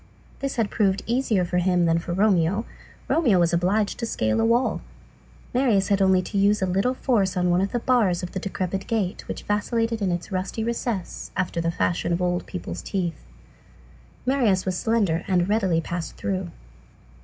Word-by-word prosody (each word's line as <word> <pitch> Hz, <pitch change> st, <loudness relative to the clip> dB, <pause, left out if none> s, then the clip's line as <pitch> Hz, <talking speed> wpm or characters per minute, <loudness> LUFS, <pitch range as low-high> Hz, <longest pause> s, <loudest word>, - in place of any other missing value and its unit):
This 275 Hz, 0 st, -3 dB
had 230 Hz, -, +2 dB
even -, -, -11 dB
proved 195 Hz, -2 st, +2 dB
easier 230 Hz, -6 st, +1 dB
for 180 Hz, +1 st, 0 dB
him 180 Hz, -1 st, +2 dB
than 165 Hz, 0 st, +3 dB
for 170 Hz, -, -6 dB
Romeo; 195 Hz, +2 st, +2 dB, 0.4 s
Romeo 250 Hz, -, +3 dB
was 170 Hz, 0 st, +2 dB
obliged 195 Hz, +5 st, +1 dB
to 230 Hz, -, -2 dB
scale 110 Hz, -, 0 dB
a -, -, +3 dB
wall, 235 Hz, +3 st, +2 dB, 0.7 s
Marius 235 Hz, -7 st, +2 dB
had 200 Hz, -1 st, +2 dB
only 190 Hz, -1 st, +4 dB
to 200 Hz, +2 st, -2 dB
use 205 Hz, +1 st, +3 dB
a 190 Hz, -, +1 dB
little 195 Hz, +8 st, +1 dB
force 205 Hz, -9 st, +1 dB
on 180 Hz, 0 st, +2 dB
one 175 Hz, +1 st, +3 dB
of 195 Hz, -, -1 dB
the -, -, 0 dB
bars 225 Hz, -8 st, +2 dB
of 180 Hz, -, -5 dB
the 190 Hz, -, -3 dB
decrepit 190 Hz, 0 st, -3 dB
gate 205 Hz, -5 st, -2 dB
which -, -, -5 dB
vacillated 225 Hz, +2 st, -1 dB
in 190 Hz, -2 st, +1 dB
its 175 Hz, +3 st, -4 dB
rusty 190 Hz, +4 st, -2 dB
recess, 230 Hz, -4 st, -3 dB
after 175 Hz, -3 st, -1 dB
the 165 Hz, -, 0 dB
fashion 170 Hz, 0 st, 0 dB
of 170 Hz, -, 0 dB
old 180 Hz, 0 st, -1 dB
people's 85 Hz, 0 st, -6 dB
teeth. 175 Hz, -, -3 dB, 1.0 s
Marius 240 Hz, -8 st, +2 dB
was 185 Hz, -1 st, -1 dB
slender 195 Hz, -5 st, +1 dB
and 180 Hz, -2 st, +2 dB
readily 195 Hz, -5 st, +2 dB
passed 170 Hz, +1 st, -5 dB
through. 190 Hz, -2 st, -2 dB
190 Hz, 190 wpm, -24 LUFS, 180-220 Hz, 1.0 s, only